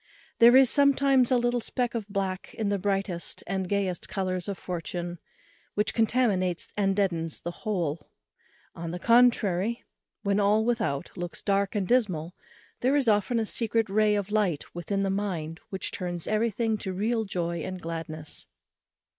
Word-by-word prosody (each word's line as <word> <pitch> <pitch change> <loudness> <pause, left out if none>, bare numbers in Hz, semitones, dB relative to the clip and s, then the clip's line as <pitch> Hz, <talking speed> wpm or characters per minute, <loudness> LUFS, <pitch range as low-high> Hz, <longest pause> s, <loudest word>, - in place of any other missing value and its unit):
There 240 +2 +8
is 265 -1 +7
sometimes 275 -1 +4
a 255 - +5
little 240 0 +1
speck 245 +1 -2
of 225 -4 -3
black 195 -2 -3
in 215 -2 -1
the 200 -1 0
brightest 195 -3 -2
and 190 -1 -2
gayest 195 -4 -1
colours 185 -2 -2
of 200 -2 -3
fortune, 175 0 -5 0.6
which 210 +1 +1
contaminates 215 -7 +1
and 195 -2 +1
deadens 170 -5 -1
the 175 - -4
whole. 170 -7 -3 0.6
On 170 0 -6
the 175 - -4
contrary, 230 -1 +3 0.4
when 200 -1 +1
all 210 +2 +3
without 220 - -1
looks 175 0 -6
dark 200 0 +1
and 195 -3 0
dismal, 185 -9 +1 0.5
there 260 +3 +2
is 280 -4 +2
often 210 +2 +2
a 225 - 0
secret 225 -1 0
ray 210 0 +3
of 205 0 -2
light 200 -8 0
within 195 +3 -2
the 195 - 0
mind, 175 -5 -3
which 190 - -3
turns 175 -2 -4
everything 220 0 0
to 190 -2 -4
real 220 +4 0
joy 170 -4 -2
and 185 +3 -5
gladness. 160 -2 -6
200 Hz, 160 wpm, -27 LUFS, 180-225 Hz, 0.6 s, There